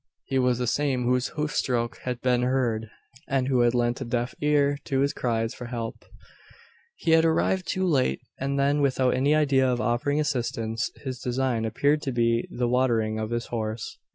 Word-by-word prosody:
He 135 - 0
was 125 -1 +2
the 125 - -1
same 130 +1 0
whose 125 +1 0
hoofstroke 125 -6 -1
had 125 -1 -4
been 125 -1 +2
heard, 120 -4 0 0.4
and 135 -2 0
who 130 -2 +2
had 120 0 +3
lent 120 +1 0
a - - 0
deaf 120 +1 -2
ear 145 -1 +2
to 135 -1 +1
the 140 - -2
cries 115 -2 -1
for 125 - -8
help. 115 -2 -5 0.9
He 165 - -1
had 160 0 +6
arrived 170 +3 +1
too 190 0 0
late, 130 - +2 0.2
and 140 +1 -1
then 140 +1 +2
without 130 -2 +2
any 140 +4 +2
idea 135 -4 +3
of 120 - -1
offering 120 +6 0
assistance. 115 -6 -1 0.2
His 130 -2 -4
design 125 -2 -1
appeared 140 +7 +1
to 135 - -2
be 115 -1 +1
the 120 0 -1
watering 115 -3 +1
of 110 0 -3
his 120 0 -2
horse. 110 -1 -4
125 Hz, 185 wpm, -26 LUFS, 120-140 Hz, 0.9 s, had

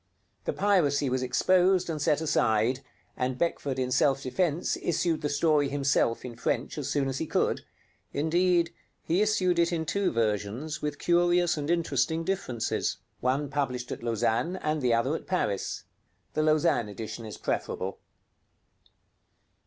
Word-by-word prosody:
The - - -1
piracy 145 -9 +2
was 130 0 0
exposed 185 +8 +3
and 155 -3 -3
set 150 +2 +2
aside, 120 -5 +2 0.4
and 125 0 -1
Beckford 145 -5 -1
in 130 -1 -1
self 135 +1 +2
defense 165 +5 0
issued 170 -1 0
the 150 - -1
story 145 -1 +2
himself 140 -4 +1
in 120 -2 -7
French 125 - -2
as 145 - -3
soon 140 -2 +1
as 135 0 -2
he 160 - -2
could; - - +1 0.5
indeed, 170 +2 +2 0.3
he 175 +5 +1
issued 185 -5 +2
it 170 +1 +3
in 160 -2 -1
two 195 +4 0
versions 115 +6 -1
with 150 -1 -3
curious 175 +1 +3
and 150 -1 -4
interesting 165 -1 +1
differences, 160 - -1 0.2
one 135 +3 0
published 130 -3 -2
at - - -5
Lausanne 120 - 0
and 155 -4 -1
the 125 -2 +2
other 115 +5 +2
at - - -7
Paris. 105 - -1 0.5
The 155 - +1
Lausanne 155 -8 +2
edition 110 +3 -6
is 105 - -8
preferable. 95 +1 -3
145 Hz, 150 wpm, -28 LUFS, 125-170 Hz, 0.5 s, exposed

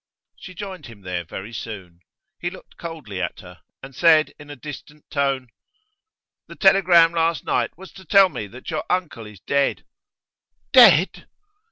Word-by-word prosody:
She 185 - -12
joined 190 -1 -8
him 115 -4 -14
there 90 -2 -4
very 95 +7 -9
soon. 95 -7 -8 0.4
He 175 - -2
looked 185 - -15
coldly 150 - -7
at - - -4
her, 90 -2 -14 0.2
and 135 0 -10
said 160 0 +4
in 145 0 -13
a 145 - -8
distant 150 +2 -11
tone: 135 -3 -1 1.0
'The - - -11
telegram 180 -4 +5
last 165 -1 0
night - - -1
was 190 +1 -12
to 190 - -14
tell 195 -1 +6
me 105 - -6
that 125 - -10
your 155 - -2
uncle 160 -12 -2
is 105 -4 -14
dead.' 140 0 0 0.9
'Dead! - - +6
145 Hz, 160 wpm, -22 LUFS, 110-170 Hz, 1.0 s, tell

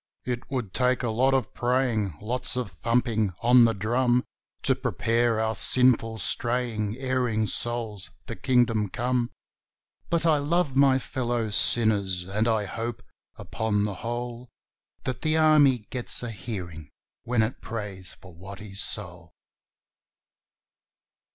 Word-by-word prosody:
It 125 0 -4
would 125 -8 -4
take 125 0 +1
a 120 - 0
lot 130 +4 +2
of 130 - -1
praying 120 - 0
lots 125 +5 0
of 125 -6 -3
thumping 110 +1 0
on 120 0 +7
the 115 -1 +1
drum 120 +4 +1 0.4
To - - +4
prepare 115 +1 0
our 110 0 0
sinful, 115 -2 +3
straying, 115 -3 0
erring 125 -4 0
souls 115 -3 -1 0.2
for - - -6
Kingdom 115 -5 +1
Come; 120 +2 -1 0.8
But 170 -1 +2
I 155 -3 +4
love 150 -1 0
my 135 -1 +5
fellow 120 -4 -2
sinners, 100 -5 +3
and 100 +5 -1
I 110 -2 +1
hope, 115 +4 -5 0.3
upon 110 -2 -2
the 105 -1 -2
whole, 120 +1 -5 0.5
That 125 -2 -3
the 155 0 +1
Army 145 -7 +4
gets 125 0 -1
a 120 - -4
hearing 90 - -7 0.3
when 120 -2 +1
it 110 +4 -4
prays 100 -5 -6
for 95 -2 -16
Watty's 100 +3 -8
soul. 90 -5 -6
115 Hz, 130 wpm, -26 LUFS, 105-125 Hz, 0.8 s, on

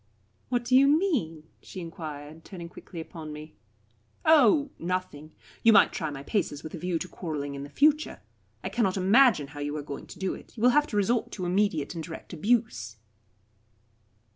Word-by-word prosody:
"What 245 -1 0
do 255 +1 +3
you 275 +1 +7
mean?" 280 - +1 0.2
she 190 - -9
enquired, 155 -2 -8
turning 170 -4 -9
quickly 175 0 -10
upon 160 -1 -8
me. 150 +1 -9 0.7
"Oh 290 -2 +5
nothing. 170 -4 -4 0.3
You 225 - +6
might - - +6
try 160 -4 -2
my 140 -2 -7
paces 150 -4 -2
with 155 - -8
a 170 - -5
view 180 0 -1
to 180 - -5
quarrelling 150 -5 -5
in 140 - -6
the 140 - -7
future. 300 - +2 0.4
I - - -2
cannot 200 -5 0
imagine 195 - +4
how 145 0 -10
you 145 +1 -3
are 150 - -5
going 140 -1 -7
to - - -11
do 190 0 -2
it. - - -13
You 220 - -4
will 250 - +7
have 295 +3 +3
to 210 - -3
resort 220 +4 +1
to 185 - -4
immediate 180 -5 0
and 165 -2 -5
direct 160 +2 -9
abuse." 160 - 0
180 Hz, 190 wpm, -27 LUFS, 155-235 Hz, 0.7 s, you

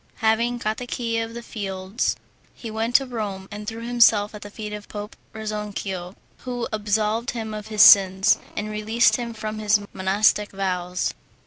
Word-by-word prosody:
Having 230 +2 +1
got 215 -2 -2
the 250 - -6
key 230 -2 -2
of 225 0 -4
the 235 - -6
fields, 195 0 -2 0.4
he 230 - -7
went 225 +2 -2
to 270 - +6
Rome, 205 -6 -5
and 210 +1 -7
threw 230 +1 -5
himself 230 -4 +4
at 210 - -9
the 205 - -8
feet 210 0 -7
of 210 0 -7
Pope 210 0 -7 0.2
Rezzonico, 210 -4 -5 0.2
who 245 -2 -4
absolved 215 +3 0
him 220 -2 -4
of 210 -1 -6
his 215 -1 +5
sins, 195 0 +7 0.2
and 205 - -2
released 215 +1 +2
him 235 -1 -4
from 215 0 -5
his 210 0 +3
monastic 205 +2 +2
vows. 180 -2 -2
215 Hz, 175 wpm, -23 LUFS, 205-230 Hz, 0.4 s, sins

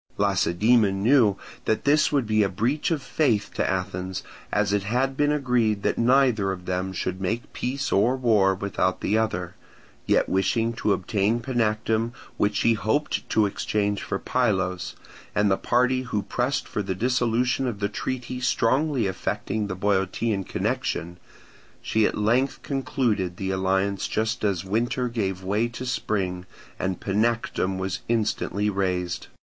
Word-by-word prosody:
Lacedaemon 100 +1 +2
knew 115 -5 +4 0.3
that 110 - 0
this 150 +2 +4
would 140 -4 +2
be 110 0 +2
a 100 - +2
breach 115 +10 0
of 155 -5 -1
faith 120 -11 +1
to - - 0
Athens, 90 0 -3 0.3
as 105 -1 +1
it 105 - +2
had 125 +7 0
been 145 +1 +2
agreed 125 -7 +1
that - - 0
neither 120 -5 +3
of 90 -1 -6
them 90 +1 -2
should 95 0 -3
make 110 +5 -3
peace 135 +2 -2
or 110 +6 +3
war 105 -6 +3
without 95 -1 -1
the 105 - +1
other; 90 -6 -1 0.5
yet - - +3
wishing 115 +5 +1
to 115 -3 0
obtain 100 +4 +1
Panactum 115 -1 0 0.2
which 105 0 +1
she 115 +3 +3
hoped 110 +8 -1
to 110 - +3
exchange 100 0 -1
for - - -2
Pylos, 90 -1 -1 0.4
and 105 -1 +3
the - - +5
party 125 +4 +2
who 105 -5 -2
pressed 125 +7 -1
for 105 - -2
the 95 -2 -3
dissolution 125 +3 +1
of 110 -5 -3
the 100 - +1
treaty 125 +4 -4
strongly 130 +1 +2
affecting 105 +2 -2
the 95 - -4
Boeotian 100 +2 0
connection, 85 0 -2 0.6
she 110 -1 +2
at - - -3
length 120 +6 +1
concluded 115 -10 -1
the 95 -1 -2
alliance 95 +1 0
just 110 +1 -1
as 95 -3 0
winter 120 +5 0
gave 95 -5 -2
way 105 +5 +1
to 120 +2 -7
spring; 95 -7 -2 0.3
and 95 -1 -2
Panactum 105 -2 0
was 95 -1 -2
instantly 105 -2 0
razed. 90 -3 -1
105 Hz, 150 wpm, -25 LUFS, 95-120 Hz, 0.6 s, the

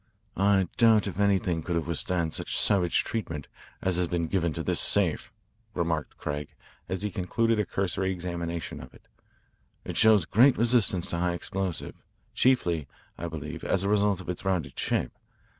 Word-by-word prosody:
"I 95 -1 +3
doubt 115 -3 +5
if 100 -1 -5
anything 95 -5 +2
could 85 +1 -3
have 85 - -1
withstood 85 0 -1
such - - -2
savage 90 -5 +3
treatment 80 -10 -4 0.4
as 95 -2 +2
has 90 -1 +2
been 85 -1 -1
given 85 -1 0
to - - -3
this - - 0
safe," - - +1 0.4
remarked 85 -3 -2
Craig 75 -1 -5 0.3
as 95 +1 -3
he 105 - -2
concluded 115 +5 0
a 105 - 0
cursory 95 0 -1
examination 85 -2 -4
of 65 - -13
it. - - -20 0.8
"It - - -5
shows 110 -6 +5
great 125 +9 +5
resistance 115 -6 +3
to 85 - -1
high 90 0 +1
explosives, 90 0 -4 0.3
chiefly, 85 - +2 0.3
I 85 - -5
believe, 80 0 -7
as 95 - +1
a 100 - 0
result 100 -2 +2
of - - -12
its 90 - -4
rounded 90 -8 -2
shape. - - 0
90 Hz, 170 wpm, -27 LUFS, 85-100 Hz, 0.8 s, doubt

